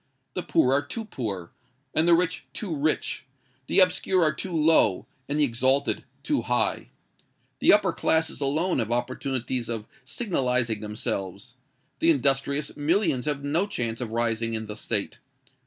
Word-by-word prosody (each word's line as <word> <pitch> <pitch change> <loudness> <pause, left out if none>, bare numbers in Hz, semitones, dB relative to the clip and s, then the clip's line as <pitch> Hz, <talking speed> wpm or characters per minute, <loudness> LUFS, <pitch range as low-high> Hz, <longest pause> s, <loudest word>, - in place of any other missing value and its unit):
The - - -2
poor 130 - +2
are 140 - +3
too 225 +8 -6
poor, 100 - -5 0.4
and 160 +2 +2
the 170 - +7
rich 180 +1 -1
too 185 -7 -4
rich: 150 +2 -1 0.4
the - - +3
obscure 185 0 +3
are 155 -1 +3
too 185 +4 -5
low, 155 - +3 0.2
and 145 +1 0
the - - +4
exalted 130 +2 +1 0.2
too - - 0
high. - - -1 0.7
The - - +5
upper - - +4
classes 160 -1 0
alone 155 +5 +1
have 115 -1 -1
opportunities 125 0 -2
of 115 -2 -3 0.2
signalising 125 - 0
themselves: 105 0 -4 0.5
the 325 - +3
industrious 140 - +2
millions 150 -3 +1
have 145 -2 -2
no 160 +8 +1
chance 115 - -2
of 115 -3 -4
rising 115 0 0
in 110 0 -3
the 105 0 -7
State. 110 +1 -2
135 Hz, 155 wpm, -26 LUFS, 115-160 Hz, 0.7 s, the